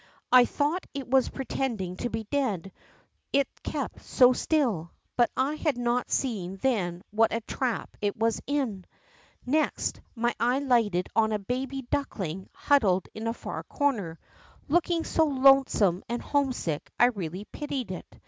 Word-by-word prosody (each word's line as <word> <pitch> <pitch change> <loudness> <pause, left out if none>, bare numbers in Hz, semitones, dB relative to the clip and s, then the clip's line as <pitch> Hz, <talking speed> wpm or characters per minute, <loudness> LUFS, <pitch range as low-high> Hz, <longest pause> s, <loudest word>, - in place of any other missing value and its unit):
I 250 -1 +8
thought 300 +9 -1
it 275 -2 -4
was 260 0 +3
pretending 235 -9 -3
to 245 - -2
he 225 0 -3
dead, 210 -10 -1 0.6
it 280 -1 +3
kept - - -4
so 255 -1 +5
still, 240 - 0 0.3
hut 240 - +5
I 270 +3 +1
had 305 -4 -1
not 240 0 0
seen 195 -8 -1
then 190 -6 -1
what 225 +2 +3
a 230 - -1
trap 245 +2 -3
it 205 -1 -1
was 225 0 +1
in. 255 -10 -1 0.6
ISText, 305 +4 0 0.2
my 240 +1 +1
eye 245 +2 +2
lighted 230 -10 +2
on 220 -1 +3
a 215 - +1
baby 260 +6 -3
duckling 190 - -3
huddled 200 -11 +2
in 220 +1 -5
a 230 - 0
far - - -5
corner, 215 - -1 0.5
looking 340 +1 +2
so 320 - +2
lonesome 265 - +4
and 240 +1 -1
homesick 255 - -1
I - - +7
really 190 -3 -5
pitied 270 -8 -4
it. 185 - -8
240 Hz, 150 wpm, -28 LUFS, 200-275 Hz, 0.6 s, I